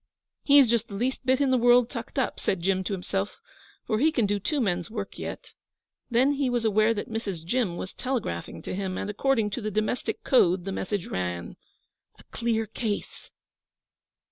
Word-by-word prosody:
'He's 280 -2 +6
just 230 0 +1
the 200 - -8
least 255 +4 -2
bit 260 +1 +4
in 275 -2 +2
the 255 - +4
world 245 0 +6
tucked 235 0 -7
up,' 265 - 0
said 190 - 0
Jim 190 0 +1
to 200 - -2
himself, 195 +2 -2 0.5
'but 215 - +1
he 310 +7 +4
can 240 -8 +1
do 205 0 0
two 290 +9 -1
men's 180 -7 0
work 210 -3 -6
yet.' - - -6 0.6
Then 255 +4 +4
he 280 -2 0
was 240 -2 0
aware 215 +1 +3
that 205 - -4
Mrs. 200 -7 -4
Jim 190 -3 0
was 185 - -6
telegraphing 235 - -3
to - - -4
him, 190 -1 -3
and 205 - -3
according 225 -1 +1
to 245 - -3
the 215 - -2
domestic 215 +4 -2
code 185 -8 +3
the 195 - -3
message 195 0 -2
ran: 90 -1 -4 0.6
'A - - -17
clear 230 -1 0
case. 220 -1 -4
220 Hz, 190 wpm, -27 LUFS, 195-250 Hz, 0.6 s, He's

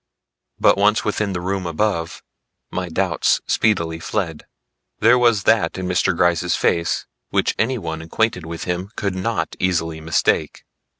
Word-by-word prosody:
But - - +4
once 105 +2 +3
within 105 -1 -1
the 90 - -3
room 95 0 -2
above, 85 -1 -2 0.5
my 90 -1 -3
doubts 90 0 +1
speedily 85 -7 +1
fled. 85 -2 -3 0.5
There 120 +3 +5
was 115 -5 +3
that 105 -7 +2
in 95 - -3
Mr. 90 0 +1
Gryce's 85 0 +2
face 85 -1 0 0.2
which - - +1
anyone 100 -10 -1
acquainted 90 +3 -1
with 85 0 -5
him 90 +2 -3
could 100 -3 -2
not 95 0 -2
easily 80 -3 -1
mistake. 80 +1 0
90 Hz, 140 wpm, -21 LUFS, 85-105 Hz, 0.5 s, There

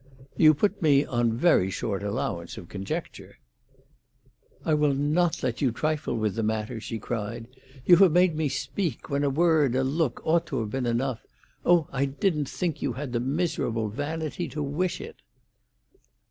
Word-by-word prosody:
"You 155 -1 +6
put 200 +6 0
me 145 -3 +4
on 120 -2 0
very 120 - +4
short 100 +1 -3
allowance 90 -4 -3
of 85 - -9
conjecture." 95 +1 -6 1.3
"I 160 - +2
will 150 -2 +2
not 155 +5 +1
let 125 -2 -2
you 130 -4 +2
trifle 150 +2 -1
with 110 -3 0
the 115 - -2
matter!" 110 0 -2
she 115 +1 -5
cried. 115 +1 -4 0.4
"You 175 - +8
have 190 -2 +6
made 175 0 +4
me 155 -2 0
speak, 145 - -3
when 140 +1 +1
a 140 - +2
word, 150 -3 +3
a 130 - +2
look, 140 -1 0
ought 165 +1 +2
to - - -2
have 105 -2 -4
been 130 0 -2
enough. 120 -1 -1 0.4
Oh, 175 -3 +4
I 135 +1 0
didn't 145 0 -1
think 175 -5 -3
you 130 - -1
had 130 -1 -6
the 120 - +1
miserable 130 -5 -1
vanity 155 - -3
to 150 - -4
wish 165 +6 -1
it!" - - -9
140 Hz, 175 wpm, -26 LUFS, 115-160 Hz, 1.3 s, You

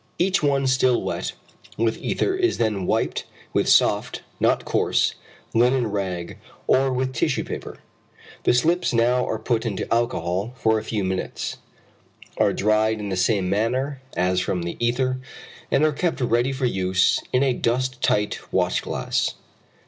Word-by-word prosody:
Each 185 +1 +2
one 140 -2 +2
still 130 -1 +3
wet - - -3 0.4
with 115 0 0
ether 385 - 0
is 370 -1 +1
then 105 -5 0
wiped - - 0 0.3
with - - +2
soft, - - +3 0.2
not - - +2
coarse, - - +1 0.4
linen 125 +2 +3
rag 95 -4 -4 0.3
or 135 0 +3
with 130 0 -1
tissue 120 - 0
paper. - - -7 0.6
The - - +3
slips 170 +7 +2
now 120 +2 +3
are 110 - -1
put 110 +1 -1
into 105 -5 -3
alcohol 100 -2 -1
for 110 -2 +2
a - - -8
few 110 -2 -2
minutes, 95 0 -3 0.8
are - - +4
dried 110 +1 +1
in 105 -1 -4
the 95 - -1
same 95 +1 +1
manner 130 +8 -1 0.2
as 90 +1 +2
from 90 -1 -1
the 85 - -4
ether, 130 +2 +1 0.5
and 140 - +2
are 155 - +2
kept 170 +2 -1
ready 120 +1 +1
for 135 -1 -2
use 95 -4 +2
in 125 +2 +3
a 135 -2 +2
dust 125 +2 -1
tight 105 0 0
watch - - +1
glass. - - -1
120 Hz, 155 wpm, -23 LUFS, 100-130 Hz, 0.8 s, are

